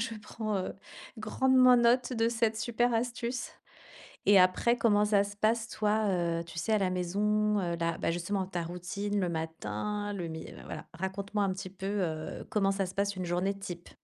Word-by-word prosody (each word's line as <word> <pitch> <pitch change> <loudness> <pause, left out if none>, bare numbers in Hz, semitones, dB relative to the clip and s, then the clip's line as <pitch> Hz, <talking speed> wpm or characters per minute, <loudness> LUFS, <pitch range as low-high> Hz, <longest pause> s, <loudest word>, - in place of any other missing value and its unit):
Je 230 0 -2
prends, 215 0 -3
heu, 185 - -2 0.5
grandement 255 +3 +5
note 245 +2 +3
de 225 -1 +2
cette 225 -1 +1
super 235 +2 +1
astuce, 240 +1 -2 0.8
et 200 -1 +7
après, 210 +6 +4
comment 210 -3 +4
ça 205 -1 +4
se 205 0 -7
passe 225 +2 +1
toi, 215 0 +1
heu, 170 -2 0
tu 165 0 -7
sais 215 +6 0
à - - +5
la 190 -2 +1
maison, 210 +4 +1
heu, 170 -1 -1
la 165 0 0
bah - - 0
justement 185 +3 -1
ta 180 -2 -3
routine, 185 +4 -3
le 180 -3 0
matin, 160 - -3
le 175 -4 -4
mi 160 0 -6
heu, - - -11
voilà, - - -7
raconte-moi 200 +3 -2
un 195 - +1
petit 185 0 -6
peu, 190 +1 -9
heu, 170 -6 -2
comment 195 -2 +2
ça 195 -1 0
se 180 - -7
passe 200 0 0
une 185 - -3
journée 180 +3 0
type? 175 -3 -7
200 Hz, 195 wpm, -30 LUFS, 180-220 Hz, 0.8 s, et